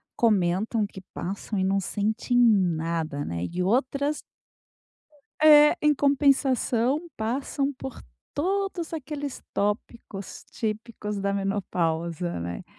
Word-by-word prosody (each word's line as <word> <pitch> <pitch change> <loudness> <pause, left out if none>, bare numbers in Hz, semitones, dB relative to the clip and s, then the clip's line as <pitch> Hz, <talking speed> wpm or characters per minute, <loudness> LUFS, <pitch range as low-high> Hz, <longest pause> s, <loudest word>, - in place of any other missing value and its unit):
comentam 210 0 +2
que 190 - -11
passam 195 +3 -4
e - - +1
não 195 +1 +2
sente 215 +6 -2
nada, 170 -9 +2
né. 85 +1 -3
E 180 +1 -2
outras 270 +8 +1 1.2
É. 300 0 +8
Em 300 0 +4
compensação, 275 0 +2
passam 270 +5 -1
por 265 -1 -8 0.3
todos 380 +1 -1
aqueles 290 -2 -5
tópicos 205 -1 -3
típicos 215 -1 -4
da 200 0 0
menopausa, 175 - -1
né. 85 +1 -5
220 Hz, 105 wpm, -26 LUFS, 190-280 Hz, 1.2 s, É